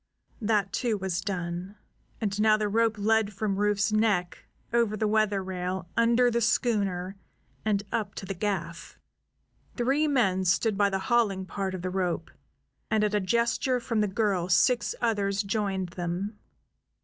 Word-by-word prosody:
That, 205 -3 +1
too, 230 -4 0
was 185 -2 -2
done, 180 0 -4 0.4
and 210 -2 -1
now 215 0 +5
the 215 -1 0
rope 220 +1 +1
led 215 0 +2
from 200 -1 -1
Rufe's 210 +1 +1
neck, 210 -5 0 0.3
over 230 -3 +2
the 215 - +1
weather 210 -2 +1
rail, 185 -1 -4
under 235 +1 +4
the 235 0 0
schooner, 200 -5 0 0.5
and 205 -2 +1
up 210 -3 -2
to - - -6
the 195 - -3
gaff. 170 -3 -4 0.8
Three 275 +5 +2
men 205 -10 +2
stood 195 +4 +2
by 200 0 +3
the 195 - -1 0.2
hauling 200 -6 +2
part 190 0 -3
of 180 - -7
the 185 - -2
rope, 180 -3 -2 0.6
and 215 -1 +2
at 210 0 +1
a 210 - +3
gesture 235 +5 +1
from 230 -2 -1
the 210 - +2
girl 190 -3 0
six 240 +8 +3
others 205 -3 +1
joined 195 -3 -1
them. 180 +4 -4
205 Hz, 160 wpm, -27 LUFS, 190-220 Hz, 0.8 s, now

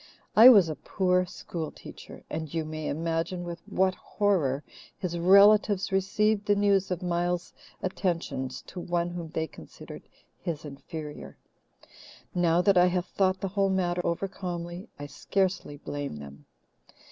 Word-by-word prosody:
I 230 +4 +11
was 200 -9 +7
a 155 - -3
poor 180 0 0
school 165 -2 -6
teacher, - - -12
and 160 -2 -5
you 165 -1 -2
may 155 0 -5
imagine 165 +3 -2
with 170 -1 -6
what 190 0 +2
horror 170 -11 0 0.3
his 175 -2 -3
relatives 200 +2 +5
received 205 +2 +1
the 205 - +4
news 200 -1 +2
of 180 0 -3
Miles's 175 0 -1 0.3
attentions 165 -9 -2
to 180 - -9
one 175 0 -1
whom 170 -2 -6
they 160 0 -2
considered 160 - -11 0.4
his 160 -3 -4
inferior. 145 - -8 1.0
Now 175 0 +2
that 195 -2 +5
I 180 - +6
have 180 0 0
thought 185 -1 0
the 195 - -2
whole 195 0 +1
matter 180 -2 0
over 170 +3 -1
calmly, 175 +1 -6
I 145 - -7
scarcely 185 0 -2
blame 145 - -5
them. 70 -1 -11
175 Hz, 145 wpm, -28 LUFS, 160-190 Hz, 1.0 s, I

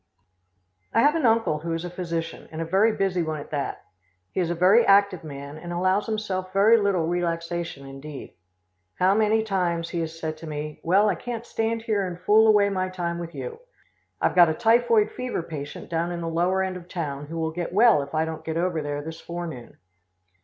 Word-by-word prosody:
I - - +5
have 295 +1 +5
an 320 -7 +2
uncle 225 -9 +2
who 165 +2 -3
is 165 +1 -3
a - - -4
physician, 170 -2 -4
and 160 - -6
a 165 - -2
very 195 +7 +3
busy 195 -4 0
one 155 -2 -2
at 145 - -10
that. 145 -2 -3 0.5
He - - -3
is 175 -2 +1
a 175 - -1
very 190 +7 +5
active 200 -4 +4
man, 140 0 -8
and 175 +1 -7
allows 185 +3 +1
himself 190 -4 -3
very 205 +4 +5
little 200 -6 +1
relaxation 170 -3 -2
indeed. 135 +1 -9 0.6
How 185 +2 +3
many 220 +1 +3
times 175 -5 -1
he 175 - -3
has 165 0 -4
said 160 -1 -4
to 160 +1 -9
me, 150 0 -5
"Well, 195 +5 +4
I 205 - +3
can't 235 +6 -6
stand 225 -1 -2
here 205 -4 0
and 175 -1 -7
fool 215 +4 +5
away 210 -2 +5
my 185 -1 -1
time 170 -2 -3
with 170 0 -7
you. 460 -1 -6 0.6
I've - - +1
got 175 -2 +7
a 160 - -1
typhoid 230 +1 +3
fever 250 -8 -3
patient 150 0 -7
down 170 +1 -1
in 170 -1 -4
the 165 - -3
lower 175 +3 +1
end 185 -1 -3
of 175 -1 -12
town 145 -6 -4
who 165 +2 -6
will 160 -1 -1
get 175 +1 -4
well 210 -4 +5
if 140 +2 -7
I 160 +1 +2
don't 160 -1 -6
get 160 0 -3
over 170 -2 0
there 145 0 -4
this 160 +1 -8
forenoon." 170 -8 -7
175 Hz, 215 wpm, -25 LUFS, 160-200 Hz, 0.6 s, got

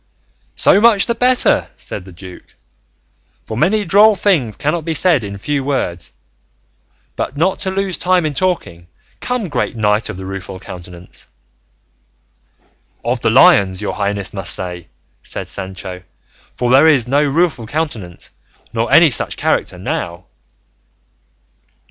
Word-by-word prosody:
"So 200 - +4
much 225 -3 +5
the 235 - 0
better," 250 +2 +3
said 95 - -7
the 95 - -12
duke, 90 +1 -13 0.9
"for 110 - -6
many 205 - +1
droll 205 +4 +5
things 165 - +1
cannot 155 +3 -1
be 160 0 -3
said 165 -7 +3
in 100 -1 -6
few 140 +7 -2
words; 90 - -3 1.0
but 140 - -4
not 180 +5 +1
to 190 - -2
lose 190 -1 -1
time 180 -2 +2
in 150 - -2
talking, 130 - -2 0.3
come, 250 -5 -2
great 145 - -2
Knight 105 0 0
of 105 - -6
the 95 - -8
Rueful 95 0 -7
Countenance 90 -1 -11 0.9
" 60 - -38
"Of - - -1
the - - +2
Lions, 95 -2 +5
your 105 - -3
highness 100 -1 -3
must 95 -2 -1
say," 90 -2 -6 0.3
said - - -5
Sancho, 95 -1 -7 0.5
"for 125 -1 -1
there 135 +5 +6
is 135 -7 +3
no 140 +4 +2
Rueful 145 -5 0
Countenance 115 - -5 0.4
nor - - -1
any - - +6
such - - 0
character - - -1
now." 85 +1 -4
125 Hz, 140 wpm, -17 LUFS, -, 1.0 s, there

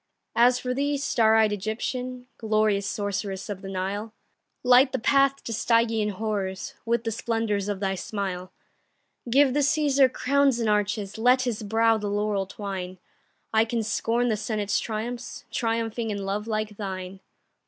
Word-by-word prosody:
As 245 +1 +5
for 250 0 -2
thee, 285 +2 0
star 225 -5 +3
eyed 220 -1 +4
Egyptian, 245 +5 -4
Glorious 215 -2 +1
sorceress 205 -1 -3
of 195 -2 -5
the 195 - -7
Nile, 200 +4 -4 0.5
Light 255 +2 +6
the - - +1
path 275 +3 +2
to 230 - -4
Stygian 225 -1 +2
horrors 200 -2 -3
With 235 0 +1
the 225 - -2
splendors 220 -3 -1
of 205 -2 -2
thy 195 -1 0
smile. 185 -1 -4 0.8
Give 270 +1 +4
the 295 - +1
Cæsar 285 -3 +3
crowns 280 -1 +2
and 230 - 0
arches, 210 0 0
Let 250 +3 +4
his 240 -4 -2
brow 225 +1 +2
the 210 - -3
laurel 205 -1 0
twine; 190 -2 -6 0.6
I 220 0 +5
can 230 0 -2
scorn 230 +3 0
the 215 - +1
Senate's 210 -1 -1
triumphs, 230 +2 -5
Triumphing 230 -1 -1
in 200 -2 -3
love 205 +2 -2
like 215 -2 -2
thine. 190 -2 -5
220 Hz, 155 wpm, -26 LUFS, 205-240 Hz, 0.8 s, Light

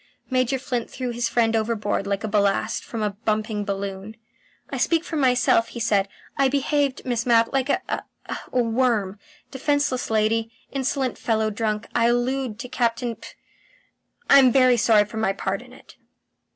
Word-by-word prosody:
Major 255 +1 +1
Flint 250 -2 -3
threw 255 -2 -4
his 235 0 -1
friend 230 -1 +2
overboard 215 -3 -1
like 200 0 -1
ballast 205 +1 +1
from 225 -2 -4
a 210 - 0
bumping 215 0 -2
balloon. 200 +1 -5 0.5
"I - - -3
speak 330 -1 +1
for 335 - -6
myself," 250 -4 +3
he 235 - -8
said. 205 -4 +2 0.3
"I 275 - +3
behaved, 280 0 0
Miss 240 -2 -1
Mapp, 230 0 +4
like 270 0 0
a - - +1
ha - - -6
worm. 230 -5 +1 0.3
Defenceless 280 -1 0
lady, 220 +1 +1 0.2
insolent 265 -1 -1
fellow 220 -1 0
drunk 215 0 -2
I 230 0 +3
allude 245 -1 0
to 250 - -6
Captain 235 -1 -1
P. - - -12 1.0
I'm 265 -3 +7
very 255 -1 +5
sorry 215 -2 +4
for 210 - -9
my 220 -3 +1
part 195 +1 -3
in 250 0 -15
it." 255 - -17
230 Hz, 160 wpm, -23 LUFS, 215-255 Hz, 1.0 s, I'm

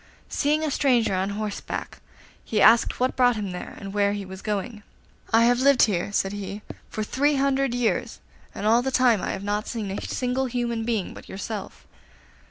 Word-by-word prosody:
Seeing 300 +2 +1
a 310 - -1
stranger 245 -7 +2
on 190 +1 0
horseback, 210 0 -5 0.4
he 215 - -1
asked 225 +3 +5
what 255 +1 +1
brought 245 -2 +4
him 205 -3 -3
there 180 - -7
and 195 -1 -8
where 205 -1 +2
he 205 -1 -4
was 190 0 -9
going. 210 +1 -3 0.5
'I 225 +1 +5
have 240 +1 +4
lived 275 -1 +5
here,' 195 -2 +1
said 195 -1 0
he, 205 +1 -6 0.3
'for 215 - -3
three 285 +7 +1
hundred 275 -2 +1
years, 245 -2 -1 0.4
and - - -4
all 230 +3 +5
that 265 +1 -1
time 245 -6 +4
I - - -3
have 195 - -6
not 205 +1 -2
seen 215 -5 -4
a 195 - -4
single 260 +1 -1
human 235 -2 -2
being 225 -5 -1
but - - -12
yourself. 200 +1 -6
225 Hz, 190 wpm, -25 LUFS, 205-250 Hz, 0.5 s, asked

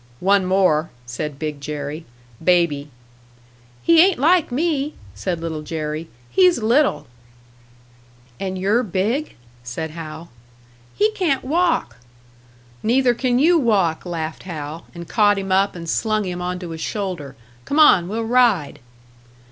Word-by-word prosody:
"One 195 0 +3
more," 185 -4 +2 0.2
said 135 +4 -5
Big 150 -1 -5
Jerry. 150 +2 -5 0.4
"Baby." 165 -5 +2 0.9
"He 335 -1 +6
ain't 380 -1 +2
like 325 +2 +3
me," 295 +1 -1 0.2
said 165 - -3
Little 165 -2 -4
Jerry. 155 +1 -4 0.2
"He's 365 -2 +5
little." 260 +6 +2 1.3
"And 190 -1 -3
you're 200 +6 +2
big?" 220 - -2 0.3
said 150 +6 -5
Hal. 165 +1 -9 0.6
"He 425 +1 +2
can't 345 -11 0
walk!" 325 - 0 0.8
"Neither 245 +2 +3
can 245 0 0
you 330 +5 +4
walk!" 195 - +1
laughed 165 -3 -5
Hal, 160 -2 -7
and 170 -1 -8
caught 205 -2 +3
him 195 -1 -4
up 195 +1 +2
and 170 -1 -7
slung 215 +4 0
him 180 -1 -4
onto 180 0 -4
his 160 -1 -7
shoulder. 180 -11 -4 0.3
"Come 285 - -2
on, 190 - +6
we'll 225 +4 -3
ride!" 230 - +2
185 Hz, 130 wpm, -21 LUFS, 160-245 Hz, 1.3 s, He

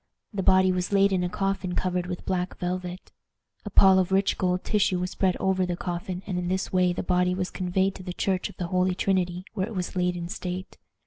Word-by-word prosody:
The 200 - -1
body 185 0 +5
was 180 +1 -1
laid 200 0 +4
in 180 -1 +1
a 180 - -1
coffin 195 -1 -2
covered 180 -1 -1
with 180 -1 -5
black 180 -1 -2
velvet. 180 0 -4 0.5
A - - -4
pall 190 -1 +6
of 185 0 0
rich 195 +1 +2
gold 180 0 0
tissue 205 -4 +2
was 180 0 -2
spread 185 -1 +1
over 190 -1 +1
the 180 -1 -2
coffin, 180 +1 -4
and 180 -3 -2
in 175 - -3
this 190 +1 -2
way 180 -1 +3
the 175 - -3
body 180 0 +2
was 185 -1 -2
conveyed 190 +1 0
to 185 - -10
the 180 - -5
church 185 0 -1
of - - -14
the 175 -2 -3
Holy 185 0 +1
Trinity, 180 -1 0
where 190 +1 -1
it 225 - -7
was 180 0 -3
laid 180 -1 +1
in 170 -1 -4
state. 180 +1 -6
185 Hz, 235 wpm, -26 LUFS, 180-190 Hz, 0.5 s, pall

